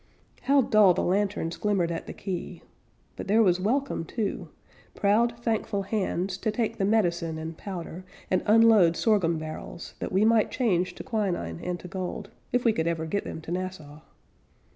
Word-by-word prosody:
How 275 Hz, 0 st, +4 dB
dull 210 Hz, -5 st, +5 dB
the -, -, 0 dB
lanterns 195 Hz, -3 st, 0 dB
glimmered 195 Hz, -5 st, 0 dB
at 165 Hz, -, -5 dB
the -, -, -6 dB
quay! 185 Hz, -3 st, -6 dB, 0.5 s
But -, -, -7 dB
there 220 Hz, +3 st, +4 dB
was 180 Hz, -3 st, +3 dB
welcome, 250 Hz, +1 st, 0 dB
too, 205 Hz, +4 st, -3 dB, 0.5 s
Proud, 230 Hz, +4 st, +2 dB
thankful 220 Hz, -3 st, -1 dB
hands, 190 Hz, -2 st, -2 dB
To 220 Hz, -, -1 dB
take 220 Hz, +1 st, -2 dB
the 195 Hz, -, +2 dB
medicine 175 Hz, -6 st, +1 dB
and 160 Hz, +1 st, -6 dB
powder, 180 Hz, -1 st, -7 dB, 0.3 s
And 185 Hz, -, +3 dB
unload 215 Hz, -6 st, +6 dB
sorghum 190 Hz, -7 st, +2 dB
barrels 155 Hz, +2 st, -7 dB
That -, -, -4 dB
we 195 Hz, +3 st, +3 dB
might 225 Hz, -1 st, +4 dB
change 185 Hz, -9 st, 0 dB
to -, -, -8 dB
quinine 185 Hz, -, -2 dB
and 180 Hz, -1 st, -3 dB
to -, -, -8 dB
gold, 190 Hz, +3 st, -5 dB, 0.2 s
If 245 Hz, 0 st, 0 dB
we 230 Hz, -, +5 dB
could 160 Hz, -4 st, -1 dB
ever 165 Hz, -1 st, -1 dB
get 200 Hz, +6 st, -2 dB
them 160 Hz, -, -6 dB
to 160 Hz, -, -8 dB
Nassau. 180 Hz, -5 st, -5 dB
190 Hz, 175 wpm, -27 LUFS, 170-215 Hz, 0.5 s, unload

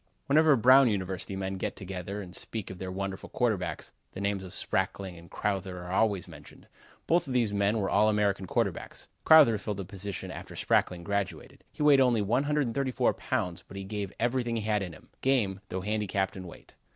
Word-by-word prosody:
Whenever 155 Hz, +1 st, +5 dB
Brown 130 Hz, +2 st, +6 dB
University 95 Hz, -2 st, -3 dB
men 95 Hz, 0 st, -3 dB
get -, -, -3 dB
together 95 Hz, +1 st, -6 dB
and 90 Hz, -1 st, -11 dB
speak 110 Hz, -5 st, -6 dB
of 90 Hz, -, -10 dB
their 95 Hz, -1 st, -5 dB
wonderful 95 Hz, 0 st, -5 dB
quarterbacks, 110 Hz, -7 st, -1 dB, 0.2 s
the -, -, -7 dB
names 100 Hz, -1 st, -1 dB
of 95 Hz, -, -9 dB
Sprackling 95 Hz, -3 st, -2 dB
and 85 Hz, 0 st, -14 dB
Crowther 95 Hz, -2 st, -2 dB
are 90 Hz, -, -7 dB
always 100 Hz, -2 st, +1 dB
mentioned. -, -, -14 dB, 0.4 s
Both 170 Hz, -2 st, +2 dB
of 130 Hz, -, -3 dB
these 115 Hz, -4 st, +2 dB
men 100 Hz, +2 st, +2 dB
were 100 Hz, -2 st, 0 dB
All 105 Hz, +2 st, +4 dB
American 100 Hz, -2 st, +1 dB
quarterbacks. -, -, -2 dB, 0.2 s
Crowther 145 Hz, -9 st, +7 dB
filled 105 Hz, -1 st, -4 dB
the 100 Hz, -, -5 dB
position 100 Hz, +1 st, -5 dB
after -, -, -9 dB
Sprackling 90 Hz, -2 st, +1 dB
graduated. 100 Hz, 0 st, -3 dB
He -, -, -4 dB
weighed 145 Hz, -2 st, +6 dB
only 120 Hz, -5 st, +3 dB
134 135 Hz, +2 st, +1 dB
pounds, 90 Hz, -2 st, -3 dB
but 100 Hz, -, -10 dB
he 100 Hz, -, -5 dB
gave 100 Hz, -1 st, -4 dB
everything 120 Hz, 0 st, 0 dB
he 110 Hz, -, -2 dB
had 105 Hz, -1 st, +1 dB
in 90 Hz, -3 st, -5 dB
him -, -, -16 dB
game, 115 Hz, -8 st, +1 dB
though 95 Hz, -, -3 dB
handicapped 100 Hz, -1 st, -1 dB
in 95 Hz, -1 st, -7 dB
weight. -, -, -14 dB
100 Hz, 190 wpm, -29 LUFS, 95-115 Hz, 0.4 s, Crowther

